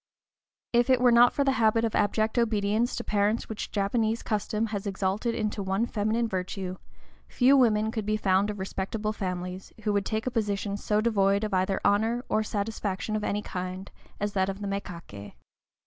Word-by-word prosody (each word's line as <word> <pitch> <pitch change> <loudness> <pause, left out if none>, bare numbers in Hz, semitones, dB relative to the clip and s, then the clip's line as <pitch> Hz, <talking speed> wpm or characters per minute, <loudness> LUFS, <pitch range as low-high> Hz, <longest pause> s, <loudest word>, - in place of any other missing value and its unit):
If 240 +2 +3
it 255 -1 +5
were 250 -1 +5
not 240 +1 +7
for 280 - +1
the 270 - +3
habit 225 +1 +3
of 225 - -2
abject 215 +3 +1
obedience 220 +1 +1
to - - -4
parents 210 +2 0
which 220 - -5
Japanese 220 +2 0
custom 215 +1 -1
has 205 0 -3
exalted 200 +4 -1
into 215 -1 -2
the 200 - -2
one 195 +4 0
feminine 225 +1 0
virtue, 185 -1 -4 0.5
few 260 +2 +4
women 220 -4 +3
could 220 -3 -4
be 215 0 +1
found 195 0 +2
of 210 - -4
respectable 200 +3 -3
families 180 -1 -5
who 210 -1 +1
would 200 -1 0
take 220 0 -2
a 255 - -1
position 205 -3 -1
so 210 +1 0
devoid 200 -2 +2
of 215 -2 -2
either 190 +1 +1
honor 225 +5 +2
or 215 - +2
satisfaction 210 -1 -3
of 215 - -2
any 210 0 -1
kind 185 +1 -5 0.3
as 205 0 -2
that 190 -1 +1
of 195 - -4
mékaké. 180 - -6
210 Hz, 185 wpm, -27 LUFS, 195-225 Hz, 0.5 s, not